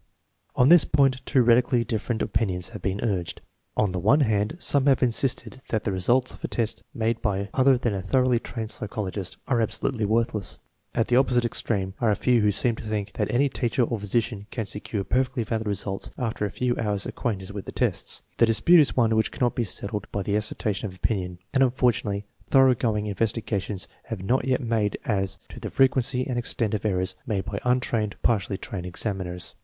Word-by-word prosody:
On 125 +2 +5
this 170 -2 +8
point 135 -3 +2
two 130 - +4
radically 120 0 +4
different 110 0 -2
opin 115 -3 0
ions 90 -1 -2
have 105 -5 -9
been 95 +2 -2
urged. 95 -7 -2 0.4
On 105 -3 +2
the 90 - -2
one 130 - +4
hand, 110 +2 +1
some 140 -5 +1
have 135 -1 +4
insisted 125 +1 0
that 110 -2 0
the 100 - -1
results 120 +8 +1
of - - -15
a - - 0
test 115 -1 -1
made 115 0 -1
by 100 -2 -1
other 130 0 +4
than 120 -3 -1
a 95 - -2
thoroughly 125 +5 +2
trained 110 -2 -6
psychologist 100 -3 -4
are 120 -3 +2
absolutely 110 +1 -1
worthless. 110 -2 0 0.4
At 115 - +2
the 125 - +4
oppo 135 -1 +3
site 120 -1 +3
extreme 100 -5 -1
are 115 - +3
a 105 - +3
few 125 0 +2
who 105 0 +3
seem 115 +3 +1
to - - -8
think 105 -2 -3
that - - -1
any 135 +4 +3
teacher 125 -1 0
or 115 -1 -1
physician 105 0 -1
can 115 -3 -3
secure 105 0 -3
perfectly 130 +2 0
valid 110 0 -2
results 100 -1 -2
after 115 -4 -2
a - - -6
few 125 +5 -1
hours' 105 -3 -1
acquaintance 100 -5 -3
with 100 -1 -6
the - - -6
tests. - - -1
The 115 - +5
dispute 115 +11 +6
is 145 - +3
one 115 -2 +3
which 110 0 +2
cannot 120 -2 0
be 120 - -1
settled 100 0 -3
by 100 - -2
the 100 +1 -1
as 105 0 0
sertion 105 -1 -2
of 95 - -10
opinion, 90 -2 -2 0.2
and, 135 - +3
unfortunately, 120 -6 +1 0.2
thoroughgoing 120 -6 +3
in 105 - -2
vestigations 105 -2 -2 0.2
have 105 -5 -5
not 125 +5 +1
yet 130 0 +1
been 120 - -5
made 105 -3 +1
as 100 -6 0
to - - -10
the - - -5
frequency 130 -1 +2
and 125 -2 -1
extent 115 -3 -2
of 105 0 -2
errors 95 -2 0
made 100 -3 -1
by 105 -2 -4
untrained 120 -4 0
or - - -29
partially 100 -3 +1
trained 90 -2 -6
examiners. 90 -1 -4
110 Hz, 210 wpm, -25 LUFS, 100-125 Hz, 0.4 s, this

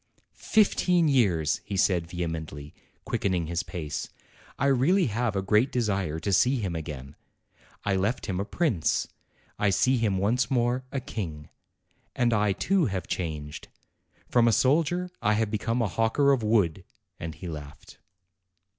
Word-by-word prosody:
"Fifteen 180 -5 +2
years!" 95 - +2
he 100 -2 -4
said 90 -3 +2
vehemently, 80 -4 -5 0.3
quickening 90 -4 0
his 85 +2 -2
pace. 80 -7 -5 0.5
"I - - 0
really 140 +8 +3
have 115 -1 -1
a 95 - 0
great 105 +6 +3
desire 100 -9 -1
to 100 - -1
see 125 +7 +4
him 100 -8 -2
again. 75 -4 -7 0.7
I 100 -2 +1
left 105 +6 -1
him 95 -3 -2
a - - 0
prince; 120 - 0 0.5
I 105 - +3
see 125 +7 +3
him 105 -5 +1
once 115 +6 +1
more, 125 0 +1
a 135 - -1
king. 80 - -6 0.7
And 120 -1 +2
I, 105 -1 +2
too, 180 - +1
have 95 -3 -3
changed. 75 -4 -5 0.6
From 120 -1 +3
a - - +5
soldier 165 +8 +2
I 105 - +2
have 110 -1 0
become 115 +3 0
a - - +1
hawker 115 +8 +2
of 135 -3 +2
wood." 100 -6 +1 0.4
And 80 -2 -5
he 90 +3 -8
laughed. 75 -3 -9
105 Hz, 155 wpm, -27 LUFS, 85-125 Hz, 0.7 s, a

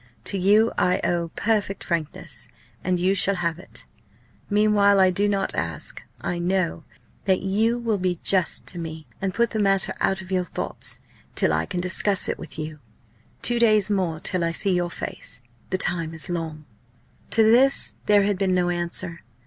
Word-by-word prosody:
To 195 - -1
you 210 +5 +4
I 180 - +2
owe 170 -1 0
perfect 205 -3 0
frankness, 165 -4 -3 0.4
and 180 -1 0
you 185 +2 +2
shall 200 0 +4
have 170 -2 -2
it. 185 - -11 0.6
Meanwhile 205 -1 +4
I 185 -1 +5
do 200 +3 +1
not 200 -1 0
ask - - -4 0.2
I 175 - -3
know 175 -2 -1 0.4
that 190 -2 +2
you 220 +5 +1
will 230 -4 -1
be 180 -2 -1
just 185 -4 +2
to 175 - -6
me, 160 -1 -6 0.2
and 195 -1 0
put 235 +4 +1
the 220 - -2
matter 195 -2 +2
out 190 - +2
of 190 0 -9
your 185 -1 +1
thoughts 180 - -4 0.4
till 80 - +2
I 80 +1 0
can 175 - -3
discuss 185 +2 +3
it - - -3
with 165 - -8
you. 155 -1 -6 0.6
Two 240 0 +2
days 215 -3 +4
more 180 -5 0
till 180 +1 -2
I 165 0 0
see 195 +2 +1
your 175 -1 0
face! 130 - -6 0.3
The 185 - 0
time 165 -3 0
is 160 +3 -2
long!" 160 -3 -4 0.6
To 225 - +4
this 250 +5 +4
there 205 -1 +5
had 200 -2 0
been 190 -2 +2
no 175 -1 +2
answer. 175 0 -2
185 Hz, 180 wpm, -24 LUFS, 170-205 Hz, 0.6 s, I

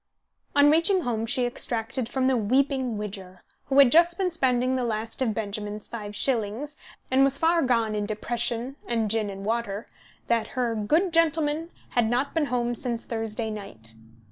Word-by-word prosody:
On 290 0 +6
reaching 335 +4 +4
home 230 -5 -2
she 250 +1 +1
extracted 240 0 -2
from 260 0 0
the 260 0 +3
weeping 255 +1 +1
Widger, 190 -3 -7 0.2
who 270 - 0
had 275 -3 +8
just 340 +1 +5
been 375 -2 0
spending 255 -4 +1
the 255 - -1
last 225 +1 -3
of 225 -5 +1
Benjamin's 210 0 -4
five 210 -3 -7
shillings, 245 +5 -1 0.4
and 265 +1 +5
was 275 0 +3
far 330 +2 +3
gone 230 -5 +1
in 210 -1 -2
depression 235 +4 -2
and 225 -3 0
gin 220 -2 +1
and 195 0 -7
water, 220 -2 -2 0.4
that 230 +2 -1
her 240 -2 +1
"good 315 - +1
gentleman" 320 -1 +2 0.2
had 235 -2 +1
not 250 +4 0
been 320 -2 +1
home 240 -2 -1
since 235 -1 -3
Thursday 225 -1 -3
night. 155 - -6
240 Hz, 170 wpm, -26 LUFS, 215-275 Hz, 0.4 s, had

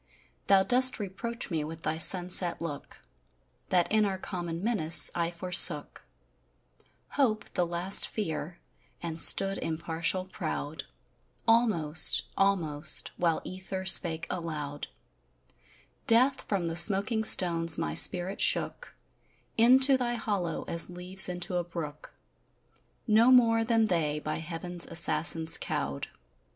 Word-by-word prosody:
Thou 195 -1 +4
dost 255 +3 +3
reproach 230 +3 -6
me 160 -2 -3
with 160 +1 -10
thy 160 +1 -4
sunset 180 +1 +3
look, 145 - -9 0.7
That 180 -1 +1
in 215 0 +2
our 195 -2 -3
common 175 -2 -7
menace, 190 -8 +3
I 170 -1 -2
forsook 175 -3 +3 1.1
Hope, 235 -7 -2
the 175 - -2
last 175 +3 +1
fear, 175 -4 -6 0.5
and 165 -1 -4
stood 195 0 +5
impartial 165 +3 -3
proud: 75 - -7 0.6
Almost, 210 -9 +4
almost, 160 -7 -1
while 165 -2 -1
ether 190 0 -8
spake 170 -3 +3
aloud, 150 -4 -7 1.2
Death 255 +4 +3
from 195 -4 -3
the 165 0 -5
smoking 205 +5 +2
stones 165 -5 0
my 75 - -4
spirit 180 - +1
shook - - -1 0.6
Into 260 +4 +5
thy 240 -1 -3
hollow 200 -8 -4
as 170 +1 -3
leaves 180 +2 -1
into 180 0 -5
a 175 - -2
brook, 165 -4 -9 0.9
No 225 +2 +3
more 230 -3 +3
than 225 -1 0
they 160 -7 -2
by 155 0 -5
heaven's 170 +2 -7
assassins 165 -1 +1
cowed. 70 0 -5
180 Hz, 120 wpm, -27 LUFS, 165-210 Hz, 1.2 s, stood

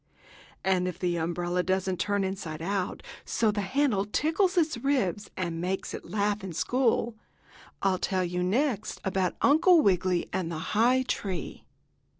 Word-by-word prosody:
And 185 -1 +2
if 180 -2 -4
the 175 -2 -1
umbrella 175 +2 -1
doesn't 185 0 -1
turn 205 -1 +1
inside 185 -5 -4
out 190 +2 -2 0.2
so 220 -2 +1
the 205 0 -2
handle 235 -1 +1
tickles 325 - +1
its 315 -7 +2
ribs 220 -8 0
and 170 -3 -2
makes 185 +2 -2
it - - -7
laugh 205 -1 0
in 190 -3 -5
school, 240 +5 +1 0.7
I'll 190 -2 +2
tell 185 -1 0
you 180 0 -2
next 230 +5 0
about 190 -1 0
Uncle 320 +4 +6
Wiggily 185 - +2
and 180 -3 -1
the 165 - -3 0.2
high 245 +4 +4
tree. 190 -8 -4
190 Hz, 155 wpm, -28 LUFS, 180-235 Hz, 0.7 s, Uncle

